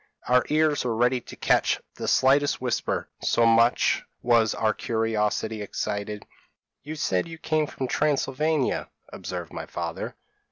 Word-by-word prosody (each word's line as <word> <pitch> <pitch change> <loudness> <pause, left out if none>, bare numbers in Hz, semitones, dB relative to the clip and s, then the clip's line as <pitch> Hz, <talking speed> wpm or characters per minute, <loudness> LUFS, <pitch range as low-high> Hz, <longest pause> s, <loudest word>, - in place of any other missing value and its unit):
Our 125 0 +4
ears 155 -1 +2
were 120 -2 -1
ready 125 +2 +2
to - - -11
catch - - +2
the - - -6
slightest 140 +2 +3
whisper 125 -2 -1
so 115 - +2
much 115 +1 +4 0.2
was 115 -3 +3
our 110 -1 +1
curiosity 110 -1 -1
excited. 105 0 -4 0.6
"'You 155 +2 -7
said 95 - 0
you 165 -1 -8
came 155 -1 0
from 130 - -4
Transylvania?' 150 +1 0 0.2
observed - - -6
my - - -6
father. - - -5
125 Hz, 135 wpm, -26 LUFS, 110-145 Hz, 0.6 s, Our